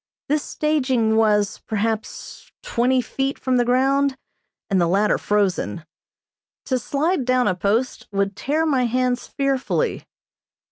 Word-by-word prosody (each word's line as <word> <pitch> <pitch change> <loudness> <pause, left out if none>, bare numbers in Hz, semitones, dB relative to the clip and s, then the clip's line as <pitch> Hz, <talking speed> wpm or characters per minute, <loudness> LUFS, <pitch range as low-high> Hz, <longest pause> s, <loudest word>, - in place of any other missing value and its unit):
This 300 +1 +2
staging 260 -9 0
was, 210 -2 +2
perhaps, 220 0 -4
twenty 250 +2 +1
feet 270 +3 -2
from 255 -1 0
the 245 - +3
ground, 270 +2 +2 0.5
and 190 -3 +2
the 170 - +3
latter 200 +4 +2
frozen. 185 - -1 0.8
To 255 -2 0
slide 295 +6 0
down 255 -1 +2
a 185 - +2
post 205 +8 -1
would 200 0 -1
tear 310 +4 0
my 265 -5 +2
hands 250 +1 0
fearfully. 275 -1 -1
250 Hz, 130 wpm, -22 LUFS, 210-270 Hz, 0.8 s, the